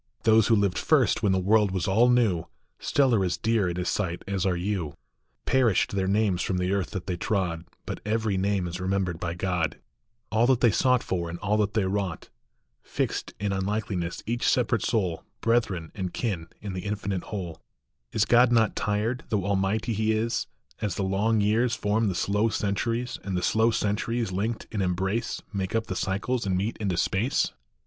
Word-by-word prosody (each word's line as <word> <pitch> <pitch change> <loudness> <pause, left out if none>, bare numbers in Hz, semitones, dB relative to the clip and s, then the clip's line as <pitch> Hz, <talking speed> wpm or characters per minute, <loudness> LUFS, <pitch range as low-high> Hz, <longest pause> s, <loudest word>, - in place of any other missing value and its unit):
Those 110 -1 +5
who 115 - +5
lived 100 -3 +1
first, 140 -7 +3
when 105 -4 +2
the 95 - +3
world 105 +2 +3
was 95 -3 -2
all 110 +6 +4
new, 110 -9 +2 0.3
Still 135 -3 +2
are 100 -4 +3
as 90 -1 0
dear 110 -2 +1
in 85 - -3
his 90 0 -1
sight 90 -4 -2
as 100 -1 0
are 90 - +1
you; 90 -5 -2 0.5
Perished 125 -7 +3
their 95 -1 0
names 100 -2 +2
from 90 - -1
the 90 +1 0
earth 100 -2 0
that 95 -4 -5
they 90 - -2
trod, 85 -3 -1 0.2
But - - -5
every 110 -1 0
name 95 0 0
is 90 +1 -5
remembered 95 -2 -1
by 85 -1 -3
God, 90 -4 -1 0.5
All 115 +2 +3
that 130 -2 +4
they 120 -3 +5
sought 125 +3 +3
for, 85 -2 -2
and 85 - -5
all 105 +3 0
that 105 0 0
they 105 -3 +2
wrought. 95 -3 -2 0.5
Fixed - - -3
in 100 0 -1
unlikeness 95 -3 -2
each 120 +2 -1
separate 115 -3 +2
soul, 90 -8 0 0.2
Brethren 110 -8 0
and 95 -3 -4
kin 95 -9 -3
in 100 -2 -5
the 90 - -4
infinite 100 -2 -3
whole. 90 -7 -6 0.5
Is 110 - +2
God 120 +1 +5
not 115 -2 +3
tired, 110 +5 -1
though 100 -4 0
almighty 100 +3 0
He 110 +1 +1
is, 115 +2 -1 0.3
As 105 -4 -1
the 100 - -1
long 105 +3 +1
years 115 +4 +2
form 105 +1 +1
the 95 - -1
slow 105 +5 +1
centuries, 115 +4 -1
And 95 -2 -2
the 90 - -2
slow 110 +5 +3
centuries 115 0 -1
linked 110 +5 -2
in 105 - -2
embrace 95 +5 -1
Make 95 +1 -2
up 115 0 +1
the 100 -4 -4
cycles 100 +6 -1
and 95 -1 +1
meet 105 +5 -1
into 95 -5 -1
space 110 +11 +1
100 Hz, 195 wpm, -26 LUFS, 95-110 Hz, 0.5 s, Those